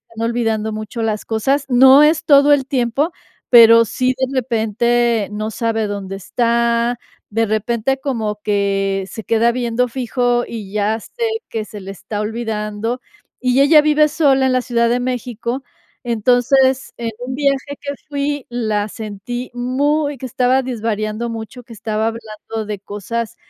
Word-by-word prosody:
están 230 +1 -1
olvidando 220 -2 -1
mucho 215 +2 -5
las 215 -1 -1
cosas. 265 +6 0
No 265 +3 +7
es 310 +1 +3
todo 285 0 +6
el 270 -2 +1
tiempo, 270 +5 0 0.4
pero 230 -1 +8
sí, 255 +4 0
de 260 - +1
repente 235 -2 +1
no 215 +1 -3
sabe 225 -2 -1
dónde 195 -1 -5
está, 235 +3 0 0.3
de 225 +2 +1
repente, 230 +4 0
como 220 -7 -3
que 195 -2 0
se 220 - -7
queda 230 +1 +2
viendo 245 0 0
fijo, 245 0 0
y 210 -4 -7
ya 215 +2 0
sé 470 - -7 0.3
que 220 -1 -3
se 210 -2 -9
le 195 +1 -7
está 205 +2 -6
olvidando, 220 +1 -3 0.4
y 255 +1 +3
ella 300 +1 +7
vive 300 0 +3
sola 275 -4 +3
en - - +1
la 255 - +2
Ciudad 235 -1 +1
de 245 +1 +1
México. 245 +1 -3 0.4
Entonces, 255 +3 +2
en 230 -1 -3
un 255 +1 -5
viaje 280 0 0
que 285 0 -4 0.2
fui 290 -1 -2
la 215 -3 -1
sentí 220 +4 -6
muy 285 +4 0
que 260 - -7
estaba 255 +2 +2
desvariando 225 -1 -3
mucho, 230 +2 -7
que 230 - -13
estaba 220 +1 -2
hablando 220 -1 -6
de 210 -2 -5
cosas 210 +3 -5
235 Hz, 155 wpm, -18 LUFS, 215-260 Hz, 0.4 s, pero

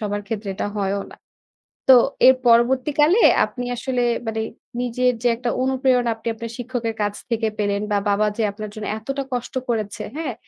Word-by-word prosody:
সবার 205 -1 -2
ক্ষেত্রে 210 -1 -4
এটা 200 - -3
হয়ও 200 0 -1
না। - - -13 0.7
তো 260 - +9 0.3
এর 260 - +8
পরবর্তীকালে 265 - +4 0.3
আপনি 245 -1 -6
আসলে 250 +1 -2 0.3
মানে 225 0 -1 0.4
নিজের 250 +1 +1
যে - - +4
একটা 240 +1 -3
অনুপ্রেরণা 260 -2 +2
আপনি 225 - -10
আপনার 225 0 -7
শিক্ষকের 245 -2 -3
কাছ 205 0 0 0.2
থেকে 230 -1 0
পেলেন 205 -1 0
বা 205 - +3
বাবা 205 +1 +2
যে - - 0
আপনার 215 +1 -7
জন্য 215 0 -6
এতটা 275 +5 -4
কষ্ট 245 0 -4 0.2
করেছে, 215 -3 -2
হ্যাঁ? 310 -6 -3
235 Hz, 170 wpm, -22 LUFS, 215-255 Hz, 0.7 s, তো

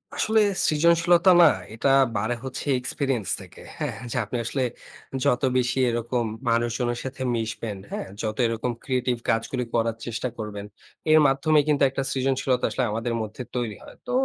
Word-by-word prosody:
আসলে 220 0 +3 0.3
সৃজনশীলতা 170 +3 +4
না, - - +9 0.3
এটা 115 - +1 0.3
বাড়ে 110 +4 -1
হচ্ছে 130 -1 -5
এক্সপেরিয়েন্স 125 - -2
থেকে, - - -14 0.2
হ্যাঁ? - - -3
যে - - -2
আপনি 115 +4 -4
আসলে 130 +3 -1 0.6
যত 125 - +2 0.2
বেশি 125 +1 0
এরকম 120 +1 -1 0.2
মানুষজনের 120 +1 0
সাথে 130 0 -6
মিশবেন, 110 -2 -3
হ্যাঁ? - - -4
যত 110 -1 -3
এরকম 115 +2 -2
ক্রিয়েটিভ 125 -2 0
কাজগুলি 115 +2 0
করার 115 -1 +1
চেষ্টা 120 +2 -3
করবেন, 105 -2 -6 0.5
এর 155 - +8
মাধ্যমেই 145 +3 +3
কিন্তু 145 -1 +3
একটা 135 +1 -3
সৃজনশীলতা 130 -1 0
আসলে 130 - -1
আমাদের 115 +2 -2
মধ্যে 110 +3 -6
তৈরি 120 -4 -2
হয়। - - -13
তো - - -3
125 Hz, 155 wpm, -25 LUFS, 115-135 Hz, 0.6 s, না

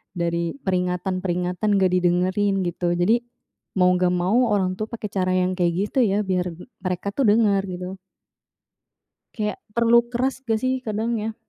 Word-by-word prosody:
dari 170 +1 -1
peringatan-peringatan 180 +1 -1
gak 190 -2 +3
didengerin, 185 +2 +1
gitu. 175 0 -1
Jadi, 210 +7 +3 0.6
mau 180 -1 +4
gak 180 0 +2
mau 210 +8 +2
orang 190 -3 0
tua, 215 - -2
pakai 220 -3 -6
cara 185 -1 0
yang 185 0 0
kayak 175 +4 0
gitu, 265 - +1
ya, 205 +2 +1
biar 180 -3 -1 0.2
mereka, 185 +1 -3
tuh, 260 0 +1
denger, 205 -2 +4
gitu. 180 +1 -6 1.4
Kayak 210 -2 -2 0.2
perlu 235 0 +5
keras, 255 +3 -1
gak, 225 0 0
sih? 260 0 +1
Kadang, 225 0 -2
ya. 220 +1 -3
190 Hz, 150 wpm, -23 LUFS, 180-215 Hz, 1.4 s, perlu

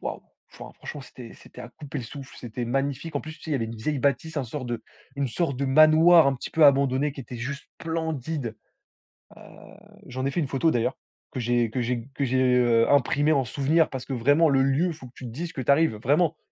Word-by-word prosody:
waouh. - - -5 0.3
Enfin - - -10
franchement 145 - -8
c'était 125 -3 -12
c'était - - -14
à 120 - -8
couper 145 0 -8
le 120 - -6
souffle. 135 +3 -10
C'était 120 0 -5
magnifique. 140 +4 -2
En - - -1
plus, 155 - -8
tu 160 - -20
sais 160 - -6
il - - 0
y - - +2
avait 115 - -2
une 115 - -7
vieille 140 +6 -2
bâtisse 145 +4 -1
un 140 - -1
sorte 125 +2 -6
de 120 -1 -4 0.3
une 140 - 0
sorte 140 +1 -1
de 140 - -2
manoir 155 +3 +6
un 135 - 0
petit 125 - -7
peu 160 -2 +4
abandonné 140 0 +3
qui 140 - -9
était 125 0 -8
juste 140 +4 -5 0.2
splendide. 160 -7 -3 0.8
Heu, - - -15 0.7
j'en 130 +1 -4
ai 140 - +1
fait 170 - -1
une 140 - -2
photo 150 +5 +1
d'ailleurs 120 -4 0 0.3
que - - -6
j'ai 120 -1 +1
que 125 - -2
j'ai 120 +1 -2
que 140 - -1
j'ai, 130 0 +2
heu, 115 -2 +3
imprimée 145 +2 +3
en 140 -3 +2
souvenir. 145 +6 +1
Parce 130 -2 -6
que 135 - -5
vraiment 145 +7 +3
le 135 -1 +3
lieu, 135 +6 +2
il 170 - -2
faut 140 -4 -12
que 120 - -15
tu 130 - -11
dises 165 +9 -6
que 135 - -5
tu 130 - 0
arrives, 140 -6 +3
vraiment, 150 +8 +1
135 Hz, 245 wpm, -25 LUFS, 125-155 Hz, 0.8 s, manoir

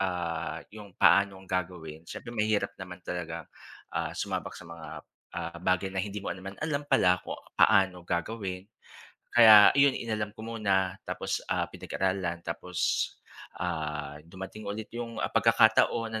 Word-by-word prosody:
ah, 90 -4 -2
yung 105 -3 -11
paanong 100 -1 +4
gagawin. 85 -4 -4
Siyempre 120 - -7
mahirap 105 -2 +1
naman 90 0 -8
talaga, 85 -2 -5 0.4
ah, - - -1
sumabak - - -3
sa - - -11
mga, 85 0 -9 0.5
ah, 85 +1 -4
bagay 90 +1 +1
na 95 - 0
hindi 105 +1 -4
mo - - -1
naman 95 +2 -9
alam 145 -2 -1
pala 90 -1 +4
kung - - -6 0.2
paano 95 -2 +4
gagawin. 95 +1 -3 0.7
Kaya 110 -3 +10
iyon, 140 -1 +5
inalam 105 -2 -3
ko 110 - -9
muna, 95 -5 0
tapos, - - -2
ah, - - 0
pinag-aralan, 95 -3 -2
tapos, 90 +1 -1 0.5
ah, 75 -4 -3
dumating 95 +4 -9
ulit 105 +2 -5
yung, 115 -1 -5
ah, - - -1
pag-kakataon 115 -1 +4
na 110 - -1
95 Hz, 145 wpm, -29 LUFS, 90-105 Hz, 0.7 s, Kaya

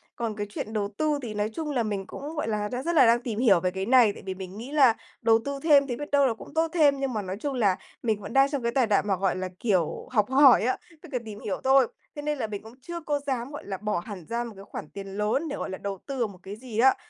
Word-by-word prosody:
Còn 230 -2 -3
cái 205 -1 -4
chuyện 215 +1 -5
đầu 210 -2 0
tư 305 -2 +1
thì 230 -4 -5
nói 210 0 -1
chung 310 +1 -3
là 250 -4 +1
mình 200 -3 -3
cũng, 300 +3 -7
gọi 300 - -2
là, 210 -1 -1
đang 250 +2 -4
rất 340 +2 -1
là 305 - +7
đang 235 +1 +4
tìm 225 -3 -3
hiểu 220 -8 +5
về 185 +1 0
cái 190 +1 -3
này, 240 -3 +5
tại - - -12
vì 190 - -3
mình 190 +1 -8
nghĩ 240 +5 -7
là 270 -6 +5 0.3
đầu 225 -1 +5
tư 280 0 -3
thêm 285 -3 +6
thì 245 - -2
biết 295 +2 -7
đâu 280 -1 +5
là 240 - +1
cũng 225 - -12
tốt 325 +1 +2
thêm 290 -5 +4
nhưng 270 -2 -1
mà 215 - -1
nói 190 0 -5
chung 285 +3 -2
là 205 -7 +2 0.3
mình 220 -3 0
vẫn 205 - -7
đang 270 0 +5
trong 280 -4 -3
cái 235 - +1
tài 250 -1 +2
đoạn 210 0 +2
mà, 195 - +2
gọi 190 0 0
là, 185 0 -3
kiểu, 185 -8 0
học 210 -3 +2
hỏi 265 -3 +7
á, 255 +3 +1 0.2
tức 345 - -12
là 250 - +1
tìm 210 -2 -8
hiểu 205 - -4
thôi, 265 -1 +5 0.3
thế 295 - -5
nên 300 0 -1
là 230 -4 -2
mình 205 -1 -6
cũng 225 +2 -12
chưa 345 +5 -6
có 295 -2 -1
dám, 255 -1 -2
gọi 290 - -8
là, 195 -1 -4
bỏ 210 -1 -1
hẳn 185 -1 -8
ra 235 +1 -1
một 235 -2 -7
cái 195 +1 -11
khoản 150 - -8
tiền 200 -1 -8
lớn 220 +10 0
để, 285 - -3
gọi - - -4
là, 190 - -5
đầu 200 -1 -4
tư 275 - -5
vào 235 - +2
một 195 -3 -13
cái 195 +2 -7
gì 225 -1 -6
á. 265 +2 +6
235 Hz, 310 wpm, -27 LUFS, 205-275 Hz, 0.3 s, là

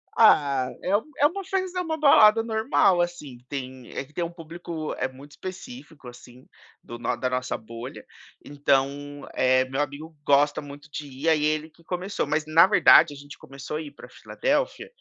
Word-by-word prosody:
Ah, 140 - +4
é 195 +2 +1
um 215 - +2 0.2
é 290 - +3
uma 385 +6 0
festa 370 -1 -2
é - - 0
uma 320 -2 -3
balada 225 -6 +6
normal, 220 -5 +2
assim, 150 -8 -5
tem 130 -2 -7
é 140 - -3
que 150 - -24
tem 175 - -2
um 170 - -3
público 165 -1 -7
é 130 - 0
muito 135 +3 -14
específico, 185 - -10
assim, 120 +1 -14 0.4
do 120 0 -9
no 120 +1 -1
da 130 0 -2
nossa 125 0 -2
bolha, 115 +5 -10 0.4
então, 145 0 -1
eh, 130 0 +3
meu 135 +2 -1
amigo 150 +3 -6
gosta 145 +1 +3
muito 145 0 -11
de 145 -1 -6
ir, 140 +5 -2
aí 155 -2 +2
ele 155 +1 0
que 165 +1 -24
começou. 185 +3 -3
Mas 155 0 0
na 165 +4 +6
verdade 170 -5 +6
a 145 - -10
gente 145 0 -12
começou 135 +3 -7
a - - -4
ir 150 - -8
pra 145 - -14
Filadélfia, - - -2
150 Hz, 190 wpm, -25 LUFS, 135-180 Hz, 0.4 s, balada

